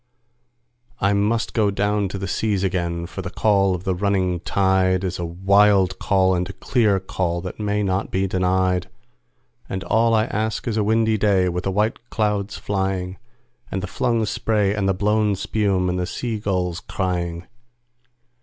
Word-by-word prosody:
I 100 +1 +2
must 105 +3 0
down 105 -4 +2
go 105 0 +1
to 95 - -5
the 95 0 -4
seas 100 +1 0
again, 85 -3 -1
for 90 +2 -7
the 95 - -5
call 100 -1 +2
of 90 - -7
the 95 - 0
running 95 -2 0
tide 95 0 +1
Is 90 -1 -3
a 85 - -2
wild 95 +2 +3
call 95 -1 +2
and 90 +1 -1
a - - -6
clear 105 -2 +1
call 90 -2 -2
that 95 +3 -7
may 105 0 0
not 95 +1 -1
be 95 +1 0
denied; 95 -1 +1 0.8
And 95 -1 -3
all 115 +2 +3
I 110 0 +3
ask 110 +3 -2
is 115 - 0
a 110 - +1
windy 110 0 +2
day 95 -3 +3
with 90 +1 -3
the 95 - 0
white 110 +4 -1
clouds 105 -2 -1
flying, 95 -2 -2 0.5
And 95 0 -3
the - - 0
flung 115 0 0
spray 105 -2 0
and 100 -2 0
the 95 - +1
blown 105 +1 +1
spume, 95 -2 0
and 90 0 -1
the 90 - -1
sea 115 +2 -3
gulls 90 -4 -1
crying. 90 -2 -3
95 Hz, 175 wpm, -22 LUFS, 90-105 Hz, 0.8 s, wild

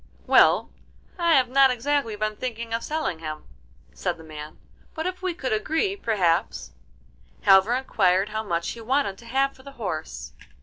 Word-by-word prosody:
'Well, - - +5 0.5
I 340 -2 +4
have 260 -2 +4
not 270 +1 +5
exactly 250 -2 0
been 215 0 -2
thinking 230 -1 -5
of 230 - -1
selling 305 - -2
him,' 155 -1 -6 0.5
said - - -3
the 160 - -13
man, 155 -1 -9 0.4
'but 320 -1 -3
if 365 0 -3
we 370 -2 -2
could 265 -8 -2
agree, 320 - 0
perhaps——' 195 - 0 0.8
Halvor 195 +5 +6
inquired 195 -6 +2
how 215 +1 -2
much 170 -5 -2
he 230 - -7
wanted 235 -4 0
to 235 - -14
have 270 +3 +1
for 260 - -17
the 275 +1 -12
horse. 160 - -5
230 Hz, 170 wpm, -25 LUFS, 190-275 Hz, 0.8 s, Halvor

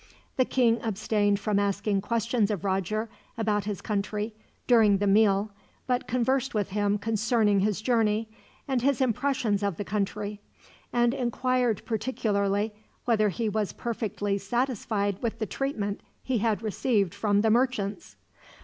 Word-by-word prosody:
The 255 - +3
king 235 -3 +2
abstained 205 -1 +1
from 205 0 +1
asking 200 0 0
questions 230 0 0
of 205 -6 -2
Roger 195 +3 -1 0.3
about 210 -3 0
his 205 -3 -4
country, 210 +1 -2 0.3
during 220 -5 +5
the 205 - 0
meal, 205 0 +3 0.3
but 250 -1 -1
conversed 255 +1 0
with 205 -3 0
him 205 +1 +1
concerning 220 -1 +2
his 210 +1 0
journey, 225 -2 +2 0.4
and 265 -3 0
his 275 0 +2
impressions 245 -4 +1
of 200 -5 -1
the 205 - -4
country; 205 +1 -3 0.5
and 240 0 +2
inquired 250 -3 0
particularly 210 -3 0 0.3
whether 215 -3 +3
he 225 +3 -2
was 210 -1 -1
perfectly 210 -4 -2
satisfied 205 -3 -1
with 230 -1 -2
the 220 - -2
treatment 210 -5 -3 0.2
he 255 -3 0
had 220 0 0
received 210 -3 +1
from 205 0 +1
the 220 0 +3
merchants. 240 +1 0
215 Hz, 140 wpm, -27 LUFS, 205-235 Hz, 0.5 s, during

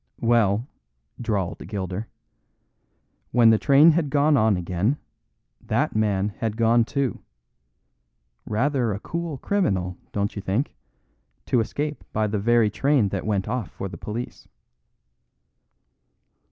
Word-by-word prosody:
"Well," 115 -2 +3 0.6
drawled 100 -7 -2
Gilder, 95 +1 -4 1.2
"when 115 -1 +6
the 110 - +3
train 145 +4 +6
had 155 -2 0
gone 145 +2 +3
on 110 -6 +3
again, 90 - 0 0.7
that - - 0
man 105 -2 +1
had 110 -3 -2
gone 115 0 +4
too. 135 +1 -2 1.3
Rather 125 0 +1
a 100 - -4
cool 170 +2 -4
criminal, 95 - -1
don't 100 +1 -2
you 100 - -4
think, 100 +9 -1 0.7
to 125 - +2
escape 145 +6 -3
by 110 0 +1
the 105 0 -1
very 115 0 +3
train 135 -3 +2
that 95 +1 -4
went 100 -2 0
off 120 -4 -2
for 100 - -6
the - - -8
police?" 115 +4 -6
110 Hz, 125 wpm, -24 LUFS, 100-135 Hz, 1.3 s, when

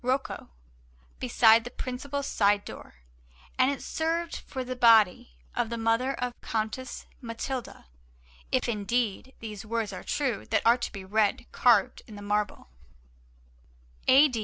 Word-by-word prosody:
Rocco, 260 +2 -2 0.7
beside 225 - +5
the 245 - -6
principal 260 +3 -4
side 205 -5 +2
door, - - -10 0.6
and 255 +1 +5
it 280 - -3
served 330 +1 -2
for 260 -2 -4
the 255 0 -5
body 220 - +5 0.2
of 225 - 0
the 235 - -3
mother 230 +4 +1
of 250 0 -3
Countess 225 +4 -4 0.2
Matilda, 240 +1 -5 0.7
if 255 -1 +1
indeed 235 +2 -1
these 210 -3 -7
words 220 -2 -2
are - - -6
true 260 -8 -2
that - - +1
are 235 +2 +6
to - - -3
be 195 -2 -8
read 210 +3 +1
carved 230 -6 +3
in 215 - -11
the 205 - -9
marble: 205 - -1 1.4
A. 275 +3 +8
230 Hz, 140 wpm, -28 LUFS, 210-255 Hz, 1.4 s, A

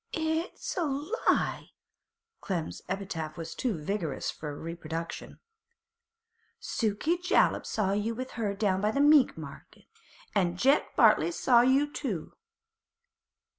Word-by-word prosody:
'It's 320 +1 -2
a 355 - +1 0.2
—— 470 +5 -4
lie!' - - +1 0.7
Clem's 175 -5 -4
epithet 180 -5 -4
was 165 -1 -6
too 235 -8 -2
vigorous 160 -3 -2
for 150 -2 -7
reproduction. 165 0 -6 1.2
'Sukey 230 +11 -1
Jollop 360 +3 +2
saw 200 -3 0
you 210 +3 -1
with 255 +2 -5
her 210 -4 -2
down 195 -2 +1
by 210 - +2
the 250 - -1
meat 290 -1 +5
market, - - -11 0.5
an' 175 -4 +1
Jeck 275 +8 +2
Bartley - - +5
saw 250 -8 +4
you 265 +4 +3
too. 200 - -4
210 Hz, 125 wpm, -29 LUFS, 170-275 Hz, 1.2 s, meat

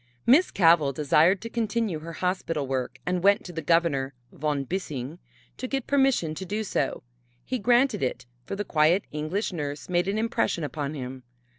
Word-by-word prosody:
Miss 290 +10 +5
Cavell 165 -6 +4
desired 155 +7 +3
to 230 - -6
continue 225 -6 -1
her 165 +2 -8
hospital 165 -4 -1
work 130 -1 -3
and 180 0 0
went 200 +1 +4
to 175 - -8
the 165 - -4
Governor, 145 -5 +1 0.2
Von 145 -1 -1
Bissing, 150 -2 -4 0.4
to 255 - -4
get 270 -1 -2
permission 270 - +2
to 175 - -6
do 210 +4 -3
so. 145 -9 -2 0.4
He 255 0 -2
granted 245 - +3
it, 130 -1 -2 0.2
for 135 - -5
the 205 +1 -3
quiet 160 +5 +3
English 155 +8 -2
nurse 145 -2 -5
made 175 0 +1
an 200 +2 0
impression 220 -6 0
upon 145 0 -3
him. 130 -1 -6
170 Hz, 175 wpm, -26 LUFS, 150-205 Hz, 0.4 s, Miss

